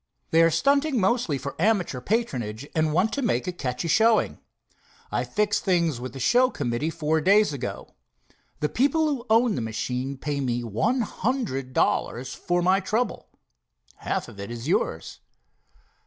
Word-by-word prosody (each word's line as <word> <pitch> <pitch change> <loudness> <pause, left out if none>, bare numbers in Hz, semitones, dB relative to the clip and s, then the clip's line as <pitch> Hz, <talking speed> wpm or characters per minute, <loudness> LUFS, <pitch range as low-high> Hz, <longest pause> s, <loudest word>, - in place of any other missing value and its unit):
They 165 - +5
are 165 - +6
stunting 280 - +2
mostly 190 - +1
for 135 +2 -5
amateur 180 - +1
patronage, 130 - -2
and 155 -1 +1
want 190 +8 +1
to 280 - -1
make 235 -7 0
a 180 - -2
catchy 130 -3 -3
showing. 220 +6 +3 0.7
I - - 0
fixed 205 -1 0
things 170 - +1
with 125 -1 -6
the 135 - -7
show 245 - +4
committee 140 - -2
four 160 -1 0
days 200 +1 +4
ago. 125 -7 -6 0.7
The 150 - +1
people 285 +5 +2
who 270 -5 -3
own 230 +1 +4
the 130 - -2
machine 125 +4 -3
pay 145 +1 -3
me 120 -2 -1
one 205 - 0
hundred 210 - -2
dollars 125 +1 0
for 175 -1 -1
my 185 +2 +4
trouble. 215 +6 -2 0.7
Half - - -3
of 100 - -12
it 100 - -6
is 120 +2 -6
yours." 80 - -1
165 Hz, 160 wpm, -25 LUFS, -, 0.7 s, are